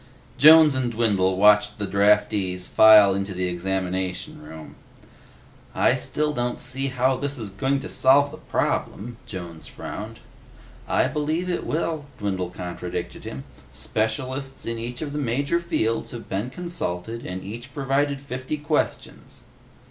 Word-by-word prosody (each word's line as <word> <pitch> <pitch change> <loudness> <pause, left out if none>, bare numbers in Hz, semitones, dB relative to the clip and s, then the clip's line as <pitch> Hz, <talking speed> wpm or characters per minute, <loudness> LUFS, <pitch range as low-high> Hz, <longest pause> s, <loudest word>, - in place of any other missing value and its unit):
Jones 155 +1 +8
and 130 -2 -1
Dwindle 100 -5 +1
watched 105 +1 +5
the 105 - -2
draftees 100 -2 +2
file 105 -2 +7
into 100 0 -3
the 90 0 -1
examination 90 -1 -3
room. 80 +1 -11 1.0
"I - - +4
still 150 0 -1
don't 120 -2 -2
see 130 +2 -1
how 130 0 +1
this 140 +1 -3
is 110 -5 -6
going 135 +8 0
to - - -6
solve 140 +2 +4
the 155 - -10
problem," 115 +3 -2
Jones 85 -4 -7
frowned. - - -8 0.7
"I - - +2
believe 160 +5 -1
it 175 - -3
will," 160 -2 -2
Dwindle 95 -4 -2
contradicted 90 0 -6
him. 65 +1 -6 0.3
"Specialists 130 +5 -3
in 115 0 -3
each 120 +4 -5
of 145 -2 -5
the 150 - -2
major 140 +5 0
fields 155 -10 -1
have 120 -2 -8
been 100 +6 -3
consulted, 115 - -4
and 95 0 -6
each 120 +6 -8
provided 140 +1 0
fifty 130 +2 -5
questions." 150 0 -3
115 Hz, 140 wpm, -24 LUFS, 95-140 Hz, 1.0 s, Jones